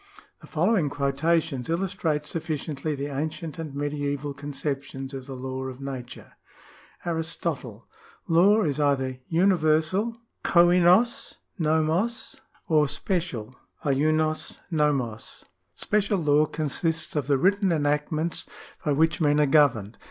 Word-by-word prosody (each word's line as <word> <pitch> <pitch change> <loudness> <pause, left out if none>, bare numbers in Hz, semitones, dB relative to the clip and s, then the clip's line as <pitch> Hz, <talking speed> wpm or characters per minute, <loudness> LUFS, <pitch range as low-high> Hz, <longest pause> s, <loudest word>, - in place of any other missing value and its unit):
The - - -13
following 175 -1 +2
quotations 140 0 0
illustrate 165 -4 -1
sufficiently 155 -2 -3
the 140 0 -4
ancient 155 +2 -4
and 155 -4 -6
medieval 145 0 -2
conceptions 140 -1 -5
of 135 -1 -7
the 135 - -6
law 130 +1 -5
of 130 -1 -7
nature: 130 -3 -7 0.4
— - - -25
Aristotle. 165 -2 -3 0.2
— 460 - -28
"Law 205 +5 +5
is 150 -2 -1
either 135 -3 +1
universal 175 +4 +2 0.3
{kolvos 180 +6 +4 0.2
rvfioc) 160 - 0 0.3
or 155 -2 +4
special 140 - -2 0.3
{icioc 155 +3 +1 0.2
i'OLioc). 135 -8 -1 0.3
Special 205 -1 +1
law 150 -2 +3
consists 160 +2 -1
of 145 -4 -1
the 140 -1 +3
written 195 +4 +2
enactments 150 +1 -1 0.4
by 150 - +1
which 160 +3 +2
men 145 -1 +3
are 150 - +5
governed. 130 -8 +3
155 Hz, 120 wpm, -26 LUFS, 140-170 Hz, 0.4 s, Law